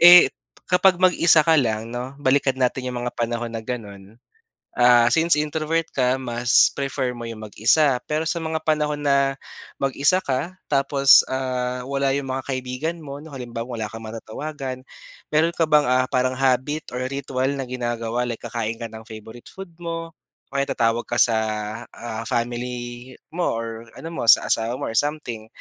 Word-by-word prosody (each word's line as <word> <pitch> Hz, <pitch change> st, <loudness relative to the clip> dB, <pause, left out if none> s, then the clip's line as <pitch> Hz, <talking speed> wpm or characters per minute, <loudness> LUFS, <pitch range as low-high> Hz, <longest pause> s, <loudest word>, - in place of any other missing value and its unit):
Eh, 175 Hz, +1 st, +9 dB, 0.3 s
kapag 180 Hz, 0 st, +4 dB
mag-isa 170 Hz, -3 st, +5 dB
ka 165 Hz, -, +4 dB
lang 115 Hz, -1 st, -2 dB
'no, 125 Hz, +3 st, -5 dB
balikan 135 Hz, -1 st, +1 dB
natin 130 Hz, 0 st, 0 dB
yung 125 Hz, -1 st, -4 dB
mga 120 Hz, -, -3 dB
panahon 120 Hz, 0 st, -3 dB
na 115 Hz, -, -4 dB
gano'n. 105 Hz, -3 st, -8 dB, 0.6 s
Ah, 120 Hz, -1 st, +6 dB
since 165 Hz, -1 st, +3 dB
introvert 155 Hz, +2 st, -1 dB
ka 130 Hz, 0 st, +2 dB
mas 120 Hz, -1 st, +3 dB
prefer 135 Hz, -2 st, -2 dB
mo 120 Hz, -, -7 dB
yung 115 Hz, -1 st, -7 dB
mag-isa. 125 Hz, +6 st, +3 dB
Pero 155 Hz, +1 st, -1 dB
sa 170 Hz, -, -1 dB
mga 160 Hz, 0 st, -2 dB
panahon 150 Hz, -1 st, 0 dB
na 140 Hz, -1 st, +1 dB, 0.4 s
mag-isa 140 Hz, +7 st, +2 dB
ka 170 Hz, +5 st, -3 dB
tapos, 140 Hz, -1 st, +5 dB
ah, 125 Hz, -1 st, -2 dB
wala 140 Hz, -1 st, 0 dB
yung 140 Hz, -1 st, -2 dB
mga 130 Hz, 0 st, -3 dB
kaibigan 130 Hz, +5 st, -3 dB
mo 140 Hz, -3 st, -8 dB
'no, 160 Hz, -, -12 dB
halimbawa 120 Hz, -2 st, -6 dB
wala 110 Hz, -, -2 dB
kang 115 Hz, +1 st, -9 dB
matatawagan. 130 Hz, +4 st, -6 dB, 0.5 s
Mayro'n 165 Hz, +3 st, +2 dB
ka 165 Hz, -, +3 dB
bang, 150 Hz, -3 st, +3 dB
ah, 130 Hz, 0 st, +3 dB
parang 130 Hz, 0 st, +1 dB
habit 135 Hz, +3 st, 0 dB
or 125 Hz, -, -4 dB
ritual 135 Hz, -1 st, -2 dB
na 135 Hz, -, -3 dB
ginagawa 120 Hz, -1 st, -3 dB
like 115 Hz, -, -6 dB
kakain 115 Hz, -1 st, -3 dB
ka 115 Hz, -1 st, -7 dB
ng 110 Hz, +1 st, -11 dB
favorite 110 Hz, +2 st, -11 dB
food 195 Hz, -3 st, -10 dB
mo 165 Hz, -1 st, -5 dB, 0.4 s
o -, -, -12 dB
kaya 140 Hz, 0 st, 0 dB
tatawag 115 Hz, 0 st, +1 dB
ka 120 Hz, -, -2 dB
sa, 115 Hz, -2 st, +4 dB, 0.6 s
ah, 115 Hz, -1 st, -6 dB
family 120 Hz, +1 st, -4 dB, 0.2 s
mo 180 Hz, -, 0 dB
or 115 Hz, 0 st, -7 dB
ano 165 Hz, -, -7 dB
mo 165 Hz, -, -5 dB
sa -, -, +7 dB
asawa 115 Hz, +2 st, +1 dB
mo -, -, -4 dB
or 115 Hz, -, -7 dB
something 145 Hz, -7 st, -2 dB
130 Hz, 175 wpm, -23 LUFS, 120-150 Hz, 0.6 s, Eh